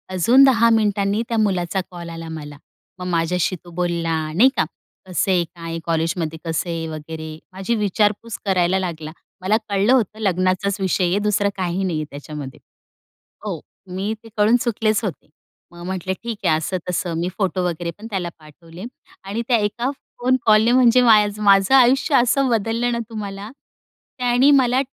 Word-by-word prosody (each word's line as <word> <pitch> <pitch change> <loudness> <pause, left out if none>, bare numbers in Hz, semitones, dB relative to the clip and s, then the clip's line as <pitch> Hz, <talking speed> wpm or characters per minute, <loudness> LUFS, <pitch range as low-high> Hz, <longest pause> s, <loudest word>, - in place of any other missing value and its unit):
अजून 240 +10 +5
10 230 -4 +5
मिनिटांनी 210 -2 +1
त्या 230 - 0
मुलाचा 190 -4 0
कॉल 170 -1 -8
आला 165 0 -7
मला. 150 -2 -8 0.4
मग 180 - -5
माझ्याशी 175 +1 0
तो 175 - -13
बोलला 170 -1 -1 0.2
नाही 230 +11 +6
का - - +3 0.4
कसं 185 +1 0
आहे, 180 -2 +3
काय 165 -1 -6
कॉलेजमध्ये 165 -1 -1
कसं 165 +2 -2
आहे 165 -1 -3
वगैरे 155 0 -7 0.2
माझी 195 +5 -2
विचारपूस 210 +2 0
करायला 185 -1 +2
लागला. 165 -4 -5 0.3
मला 200 +4 +2
कळलं 200 +5 +3
होतं 220 -4 +1
लग्नाचाच 185 0 0
विषय 185 0 +1
आहे, 180 +4 +1
दुसरं 205 -1 +1
काही 185 0 -1
नाहीये 160 -5 -2
त्याच्यामध्ये 145 -2 -8 0.9
हो, - - -3 0.3
मी 190 +4 -3
ते 225 - -13
कळून 210 +3 +4
चुकलेच 220 -1 0
होते. 195 -6 -5 0.4
मग 175 0 -11
म्हंटले, 185 0 -3
"ठीक 230 +2 -7
आहे," 155 - +4
असं 160 +4 -2
तसं. 180 -1 -2
मी 175 - -1
फोटो 185 -2 0
वगैरेपण 175 +4 -4
त्याला 190 -5 -3
पाठवले 165 +3 -13 0.4
आणि 200 +4 -3
त्या 245 - +4
एका 220 +4 -1 0.3
फोन 255 +1 +2
कॉलने 220 +1 +5
म्हणजे 250 -1 +5
माय 215 -3 +6
माझं 200 +1 +4
आयुष्य 270 +3 +4
असं 265 +2 +3
बदललं 230 +2 0
ना 235 - -1
तुम्हाला. 205 -2 -6 0.7
त्यानी 250 +2 +3
मला 260 -2 +4
195 Hz, 160 wpm, -21 LUFS, 170-225 Hz, 0.9 s, नाही